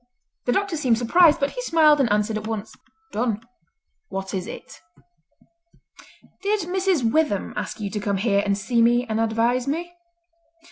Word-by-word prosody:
The 245 - +2
doctor 395 +3 0
seemed 250 -6 +2
surprised, 315 +7 +4
but 280 0 0
he - - -5
smiled 315 -9 +4
and 245 -6 +2
answered 210 +1 +1
at 215 0 -4
once, 220 -1 -5 0.4
"Done! 220 -1 -1 0.7
What 190 0 -5
is 185 -2 -3
it?" - - -10 1.6
"Did 410 +1 0
Mrs. 360 -8 0
Witham 300 -10 0
ask - - -5
you 205 -2 -4
to 210 - -3
come 200 -1 -1
here 200 0 +2
and 200 -1 0
see 230 +3 0
me 240 +1 +3
and 220 0 -1
advise 230 +3 +1
me?" 340 +5 -3
240 Hz, 160 wpm, -23 LUFS, 215-315 Hz, 1.6 s, surprised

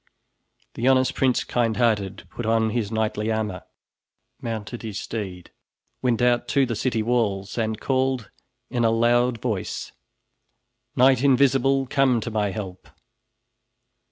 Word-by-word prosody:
The 120 - -1
honest 130 -1 +4
Prince 130 -2 +1
Kindhearted 110 -4 0
put 120 - -6
on 110 -1 +2
his 115 -3 -2
knightly 110 0 -1
armor, 105 -4 -3 0.8
mounted 115 0 -5
his 110 -3 -5
steed, 95 -6 -6 0.5
went 120 -2 +1
out 120 -1 +2
to 140 -2 +3
the 120 -2 -3
city 115 -1 -1
walls 110 -5 0
and 110 -2 -1
called 130 -4 -1 0.4
in 120 -2 0
a 115 - +4
loud 120 +1 +2
voice: 110 -6 -3 1.0
"Knight 130 0 +4
Invisible! 135 0 +3
Come 130 -2 +2
to 115 - -5
my 105 -2 0
help!" 95 -3 -7
115 Hz, 130 wpm, -24 LUFS, 110-125 Hz, 1.0 s, honest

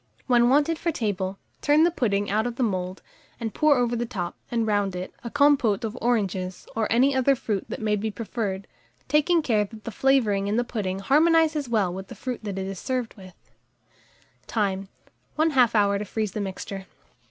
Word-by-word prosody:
When 240 -1 +4
wanted 295 +4 +3
for 340 - -1
table, 195 - -2 0.2
turn 295 +2 +4
the 345 - +4
pudding 205 -9 0
out 215 +3 +1
of 240 - -4
the 255 - 0
mould, 185 -4 -2 0.4
and 225 -3 -4
pour 305 -2 +4
over 240 -1 +1
the 240 0 -2
top, 180 -7 -4
and 230 -2 0
round 205 -3 0
it, 180 +1 -5
a 235 - -4
compôte 280 -6 +3
of 220 0 -3
oranges, 195 -6 -1
or 220 -1 -1
any 260 +4 +4
other 265 +1 +3
fruit 210 -5 -3
that - - -5
may 210 -1 +2
be 215 +2 -2
preferred, 205 -3 -4 0.4
taking 305 +4 +3
care 220 -6 +2
that 215 +1 -11
the 230 - -5
flavouring 215 -5 +2
in 205 - 0
the 240 - +2
pudding 205 -6 -3
harmonizes 305 +5 +3
well 205 -6 +1
with 190 +1 -7
the - - -10
fruit 250 -3 -5
that 200 -2 -4
is 190 -1 -4
served 255 -3 -2
with 190 -3 -12 0.2
it. - - -35
Time. 195 -3 -1 0.5
1/2 270 -7 +3
hour 200 -1 +3
to 210 - -4
freeze 215 0 -2
the 210 - -3
mixture. 195 0 -6
220 Hz, 195 wpm, -25 LUFS, 200-260 Hz, 0.5 s, When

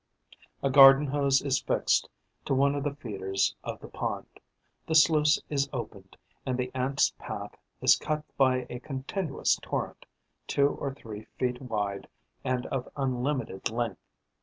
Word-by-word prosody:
A 135 - +2
garden 135 +1 +9
hose 140 -1 +2
is 140 -1 +1
fixed - - +1 0.4
to 135 - +1
one 140 +1 +3
of 145 -1 -2
the 145 -1 -2
feeders 95 -8 -1
of - - -5
the - - -9
pond; - - -4 0.6
the 160 - 0
sluice 155 -1 +5
is 140 -1 0
opened; - - -7 0.3
and 130 -1 -2
the 125 0 -2
Ants' 130 +1 +1
path - - -6 0.3
is - - +6
cut 155 0 -2
by 130 -2 +3
a 125 0 -6
continuous 135 +5 -1
torrent, - - -4 0.4
two 140 0 +3
or 140 - -4
three 110 -6 -9
feet 125 0 -1
wide 105 -5 -3 0.4
and 125 -1 -1
of 130 -2 -3
unlimited 130 -5 -2
length. 115 -3 -3
135 Hz, 150 wpm, -28 LUFS, 125-140 Hz, 0.6 s, garden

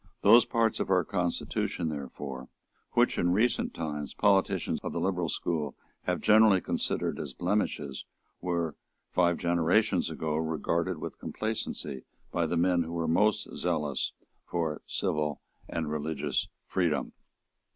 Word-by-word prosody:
Those 115 +4 +8
parts 115 -1 +1
of - - -1
our 90 -2 +4
constitution 90 -2 -1
therefore 70 -2 -6 0.4
which, - - +3
in 90 0 +3
recent 115 +5 +1
times, 75 -3 -4
politicians 100 -2 +2
of - - -4
the - - -1
liberal 90 -3 0
school 75 -4 -2 0.3
have - - 0
generally 110 -2 +6
considered - - -1
as - - -4
blemishes, 90 -7 -1 0.4
were, 85 -3 -1 0.4
five 85 -1 +3
generations 85 +3 +2
ago, 80 -1 -2
regarded 80 +2 0
with 75 - -7
complacency 105 - -2 0.3
by 85 -2 +1
the 85 - 0
men 90 0 +3
who 85 0 -4
were 85 -1 -1
most 105 +6 +2
zealous 75 -6 -1 0.3
for 80 -3 -2
civil 75 -2 -1 0.3
and 80 -2 -2
religious 75 +1 -1 0.2
freedom. 85 -5 0
85 Hz, 130 wpm, -29 LUFS, 75-95 Hz, 0.4 s, Those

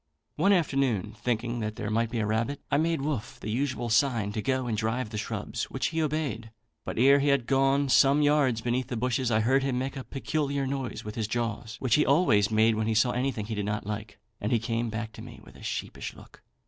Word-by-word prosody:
One 170 +7 +3
afternoon, 135 - +1
thinking 120 0 -1
that 110 -1 -3
there 105 0 -4
might 115 +1 +1
be 120 - -3
a 110 - 0
rabbit, 115 +6 -1
I - - +4
made 160 -3 0
Wolfe 140 -7 -3
the 110 - -4
usual 125 0 -1
sign 115 -4 +2
to 110 - -3
go 130 +1 0
and 115 -3 -1
drive 110 +2 -1
the 105 - -4
shrubs, 105 - -3
which - - -2
he 165 0 -1
obeyed; 145 -7 -2 0.3
but - - -5
ere 135 +4 +6
he 140 - +1
had 140 -4 +3
gone 135 +1 +2
some 140 +2 +5
yards 145 -6 +3
beneath 120 +1 -1
the 125 -3 -3
bushes, 125 +1 0
I 110 -1 +2
heard 130 +5 +3
him 135 -2 -1
make 130 +2 -2
a 135 - -5
peculiar 140 0 -2
noise 135 -4 -4
with 105 - -5
his 110 -2 -2
jaws, 115 -1 -3
which 130 -4 0
he 150 - +5
always 130 - +3
made 110 +1 +4
when 110 0 -1
he 110 - +1
saw 120 +3 +4
anything 125 -4 -1
he 110 - -4
did 105 -1 -2
not 105 0 -2
like, 105 +1 -5 0.2
and 105 - -2
he 120 - +4
came 115 +1 -1
softly 110 0 -4
back 110 -1 -5
to - - -11
me - - -10
with - - -16
a - - -14
sheepish - - -5
look. - - -16
120 Hz, 240 wpm, -28 LUFS, 110-135 Hz, 0.3 s, ere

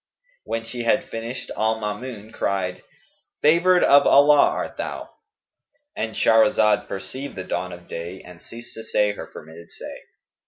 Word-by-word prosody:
When 115 0 -3
she 120 +1 -6
had 120 +3 +1
finished, 115 +3 -6
al 110 +1 0
Maamun 110 +1 -6
cried, 95 -2 -2 0.6
"favoured 170 +4 +5
of 140 0 +6
Allah 145 +1 +6
art - - -4
thou!"—And 290 - -9
Shahrazad 110 -2 +3
perceived 130 +8 -7
the 95 - -5
dawn 90 0 -3
of 85 0 -11
day 85 +3 -6
and 90 -1 -14
ceased 120 +1 -11
to 115 - -9
say 105 -2 +1
her 105 - -8
permitted 80 +2 -12
say. - - -9
110 Hz, 145 wpm, -23 LUFS, 95-135 Hz, 0.6 s, of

